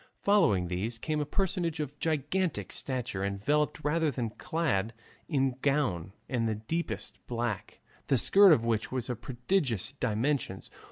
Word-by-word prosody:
Following 105 - +4
these 100 +7 -2
came 155 +6 -2
a 145 - -3
personage 170 -2 -1
of 145 -1 -4
gigantic 155 - -1
stature 125 -7 -3
enveloped 145 +11 0
rather 160 +1 +2
than 120 -5 -2
clad 120 -9 -1 0.4
in 135 -4 +2
a 125 - -7
gown 130 - +1 0.2
of 120 -3 0
the 110 - 0
deepest 160 +11 -3
black, 120 0 -3 0.3
the 135 - +3
skirt 195 - +7
of 115 -7 +4
which 115 -2 0
was 130 -1 -2
of 120 - -6
prodigious 125 - 0
dimensions. 125 -4 -1
130 Hz, 150 wpm, -30 LUFS, 110-155 Hz, 0.4 s, skirt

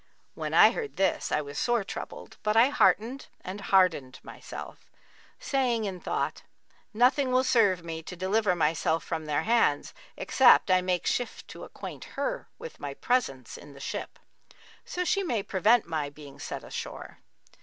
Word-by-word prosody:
When - - -4
I - - +8
heard 445 -3 -5
this, 195 - 0
I 150 - +2
was 145 -1 -6
sore 240 -3 +1
troubled - - -8
but 210 +1 +1
I 240 +4 +6
heartened 260 -1 +2
and 190 +3 -7
hardened 185 -10 +2
myself, - - -10 0.5
saying 255 - 0
in 190 -3 -4
thought, - - -2 0.5
'Nothing 255 +4 +3
will 255 +1 +3
serve 205 -9 +3
me 165 -1 -5
to 180 - -9
deliver 190 +1 +1
myself 160 0 +1
from 160 -2 -4
their 150 -1 0
hands, 225 -11 +2 0.2
except 245 -7 +5
I 185 0 +5
make 180 -1 -1
shift 245 - -2
to - - -9
acquaint - - -9
her - - -3
with 485 - -10
my 140 -1 -5
presence 135 - -1
in 145 - -13
the 140 - -13
ship, - - -5 0.7
so 360 - -3
she 395 +1 +1
may 240 - -1
prevent 210 +4 +3
my 155 -3 -2
being 145 -1 -13
set - - -6
ashore.' - - -7
195 Hz, 165 wpm, -28 LUFS, 160-245 Hz, 0.7 s, I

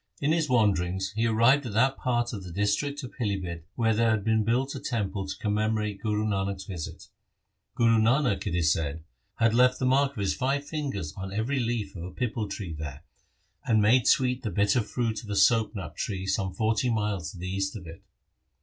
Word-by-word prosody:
In 145 +2 +1
his 160 -2 +1
wanderings 95 -5 +1
he 110 +2 0
arrived 115 +6 +4
at 105 - -6
that 130 +5 +3
part 120 -2 -1
of 100 -3 -5
the 90 - -8
district 105 - -1
of 125 - -7
Pilibhit 95 -8 -3
where 110 -2 +2
there 115 +1 +2
had 110 -2 +1
been 110 0 +2
built 125 +5 0
a 135 - -5
temple 100 -5 -2
to 95 0 -5
commemorate 105 -1 -1
Guru 105 0 0
Nanak's 100 -2 -1
visit. 90 -6 -7 0.7
Guru 115 -1 +4
Nanak, 120 -1 +2
it 85 - -1
is 80 -3 +3
said, 80 0 -3 0.3
had 115 0 +2
left 125 +1 +4
the 130 - -1
mark 135 +2 +3
of - - -17
his 100 - +1
five 140 +2 -1
fingers 135 - -4
on 95 0 -6
every 115 +7 -1
leaf 115 -5 -2
of 85 - -7
a 90 - -5
pipal 115 -2 -3
tree 95 -5 -5
there, 75 -1 -7 0.6
and 110 -1 +3
made 115 +4 +4
sweet 125 -1 +3
the 110 - -3
bitter 100 +4 +2
fruit 115 +1 -2
of 105 - -11
a 100 - -2
soap 110 +3 +3
nut 90 -7 -6
tree 95 -3 -3
some 95 0 0
forty 110 +6 0
miles 105 -7 -1
to - - -12
the 90 +2 -5
east 95 +1 -2
of 95 -4 -8
it. 85 +4 -10
110 Hz, 210 wpm, -27 LUFS, 95-120 Hz, 0.7 s, arrived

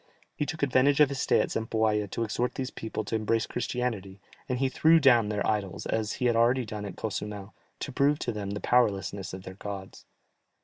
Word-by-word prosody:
He 150 - -2
took 160 -1 -4
advantage 140 +1 +3
of 150 -2 +6
his 140 -1 -4
stay - - +3
at - - -2
Zempoalla 110 -2 0
to 115 - -2
exhort 120 +3 -1
these 130 -1 -3
people 110 -1 -4
to 110 - -2
embrace 110 +1 +1
Christianity, 115 -6 -3 0.3
and 125 - 0
he 135 +1 +1
threw 160 +5 +5
down 120 -7 +5
their 105 -1 -1
idols, 105 -4 -1
as 110 -1 -1
he 125 - -3
had 120 -1 +3
already 120 +2 +3
done 105 -1 -6
at 100 - -7
Cozumel, 105 -1 -5 0.3
to - - -4
prove 140 +3 +2
to 120 - -2
them 105 -3 -4
the 100 +1 -4
powerlessness 100 -5 +1
of 95 0 -8
their 95 - -8
gods. 95 0 -8
110 Hz, 210 wpm, -28 LUFS, 105-125 Hz, 0.3 s, of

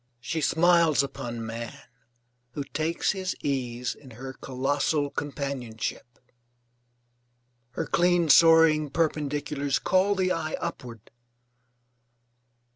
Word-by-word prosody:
She 160 +6 -3
smiles 165 -1 +4
upon 120 -4 -5
man 115 +1 -6 0.8
who 145 - -3
takes 155 +5 -1
his 190 -2 -3
ease 125 -3 -2
in 140 - -16
her 130 +1 -7
colossal 140 +3 -1
companionship. 130 -5 -5 1.6
Her - - -3
clean 175 -1 +2
soaring 155 0 +6
perpendiculars 145 -2 -1
call 190 +2 +2
the 185 -1 +1
eye 155 -3 -2
upward. 120 -10 -7
145 Hz, 95 wpm, -26 LUFS, 130-165 Hz, 1.6 s, soaring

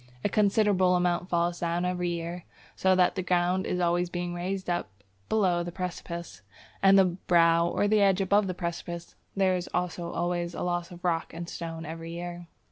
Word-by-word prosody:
A - - +3
considerable 200 -3 +3
amount 180 0 0
falls 170 0 0
down 170 +1 -1
every 180 -1 -1
year, 170 +1 -4 0.3
so 190 0 +3
that 180 -1 +4
the 190 - -2
ground 180 +1 +1
is 180 - -1
always 175 0 +1
being 175 0 -3
raised 185 +2 -3
up 175 -10 -1 0.4
below 185 -5 +2
the 175 0 -4
precipice. 170 - -6 0.4
At 195 0 +6
the 195 -1 +7
brow 170 -2 +3
or 175 - 0
edge 205 -2 +4
above 200 +1 +3
the 185 - -3
precipice, 170 -1 -5 0.2
there 190 -1 +3
is 180 0 -4
also 175 -1 -2
always 175 0 -2
a - - -3
loss 175 -1 -1
of 175 -1 -12
rock 165 -2 -1
and 170 0 -5
stone 165 -1 -6
every 165 +1 -7
year. 175 0 -6
175 Hz, 185 wpm, -28 LUFS, 170-185 Hz, 0.4 s, the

